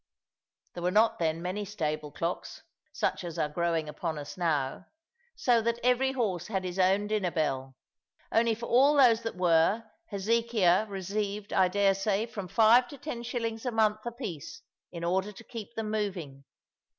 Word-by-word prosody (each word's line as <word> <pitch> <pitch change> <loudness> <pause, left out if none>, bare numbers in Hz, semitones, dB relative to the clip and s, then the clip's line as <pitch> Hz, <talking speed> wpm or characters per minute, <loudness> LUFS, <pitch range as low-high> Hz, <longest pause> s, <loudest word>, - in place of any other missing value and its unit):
There 175 - -7
were 175 - +1
not 215 +4 +3
then 165 0 -1
many 185 +3 -2
stable 155 -7 -3
clocks, 170 +4 -4 0.3
such - - -1
as 170 -2 -6
are - - +1
growing 165 0 -1
upon 155 +1 -4
us 145 -1 -7
now, 155 -3 -1 0.5
so 240 -2 +3
that 235 +1 -1
every 250 +2 +3
horse 205 -10 -1
has 190 -3 -2
his 180 +1 -4
own 190 +2 +3
dinner 210 -3 0
bell; 135 -5 -2 0.6
only 225 0 +3
for 235 +2 -6
all 275 +6 +5
those 235 -4 +6
that 230 -1 -4
were, 180 +4 +3 0.2
Hezekiah 215 -2 +2
received, 200 +1 -3
I 190 -1 +4
daresay, 195 +2 +1
from 210 -5 -7
five 230 +5 +5
to 285 - -10
ten 255 -4 -5
shillings 230 -2 -3
a 255 - -1
month 215 -1 +1
apiece 235 - -6 0.3
in 170 -1 -7
order 190 +4 0
to 210 - -13
keep 230 -1 -9
them 220 -1 -3
moving. 175 -11 -3
200 Hz, 165 wpm, -29 LUFS, 175-230 Hz, 0.6 s, those